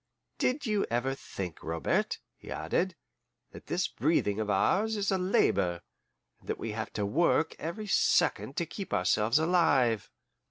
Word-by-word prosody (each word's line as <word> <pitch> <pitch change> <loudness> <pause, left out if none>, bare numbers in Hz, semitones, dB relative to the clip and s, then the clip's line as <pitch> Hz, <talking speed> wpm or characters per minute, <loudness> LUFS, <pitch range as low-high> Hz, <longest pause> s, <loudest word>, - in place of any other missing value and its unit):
Did 270 +3 0
you 210 -3 +1
ever 120 +3 0
think, 95 - -6
Robert," 80 0 0 0.2
he - - -14
added, 170 - -1 0.6
"that - - -12
this 180 +1 0
breathing 110 -7 +1
of 110 -1 -2
ours 205 - +2
is 200 -1 0
a 190 - +1
labor, 95 - +1 0.6
and - - -18
that - - -1
we 115 - -4
have 110 +1 -4
to 105 - -1
work 160 +6 +2
every 170 +7 -4
second 130 - +2
to 170 - +1
keep 195 +3 -4
ourselves 105 +7 +2
alive? 155 - +2
135 Hz, 155 wpm, -30 LUFS, -, 0.6 s, ours